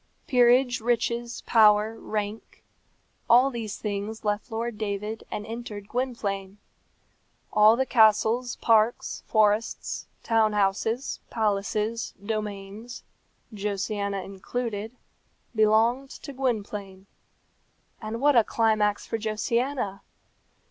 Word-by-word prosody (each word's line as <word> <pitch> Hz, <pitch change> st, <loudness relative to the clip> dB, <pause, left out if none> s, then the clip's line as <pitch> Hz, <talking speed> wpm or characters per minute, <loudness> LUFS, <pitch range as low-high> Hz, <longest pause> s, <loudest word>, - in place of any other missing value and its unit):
Peerage, 245 Hz, 0 st, +4 dB
riches, 235 Hz, +1 st, -1 dB
power, 215 Hz, -1 st, +5 dB
rank 215 Hz, -1 st, -5 dB, 0.7 s
all 250 Hz, +3 st, +6 dB
these 225 Hz, -4 st, -5 dB
things 210 Hz, +1 st, -4 dB
left 210 Hz, +3 st, -1 dB
Lord 225 Hz, 0 st, -3 dB
David 210 Hz, +1 st, -3 dB
and 210 Hz, -, -5 dB
entered 220 Hz, -3 st, -7 dB
Gwynplaine. 205 Hz, -6 st, -3 dB, 1.0 s
All 215 Hz, +1 st, +7 dB
the 265 Hz, +2 st, +1 dB
castles, 225 Hz, +1 st, +3 dB
parks, 225 Hz, 0 st, +2 dB
forests, 215 Hz, 0 st, +1 dB, 0.2 s
town 225 Hz, -2 st, +2 dB
houses, 210 Hz, +5 st, 0 dB
palaces, 215 Hz, +1 st, -1 dB
domains, 210 Hz, +2 st, -6 dB, 0.5 s
Josiana 200 Hz, -1 st, -2 dB
included, 215 Hz, +3 st, -5 dB, 0.6 s
belonged 225 Hz, +5 st, +3 dB
to 280 Hz, -, -9 dB
Gwynplaine. 205 Hz, -7 st, -3 dB, 1.0 s
And 220 Hz, +1 st, -4 dB
what 290 Hz, +1 st, +4 dB
a 230 Hz, -, +7 dB
climax 215 Hz, -2 st, +1 dB
for 225 Hz, -, -3 dB
Josiana! 220 Hz, 0 st, -1 dB
220 Hz, 95 wpm, -26 LUFS, 205-235 Hz, 1.0 s, All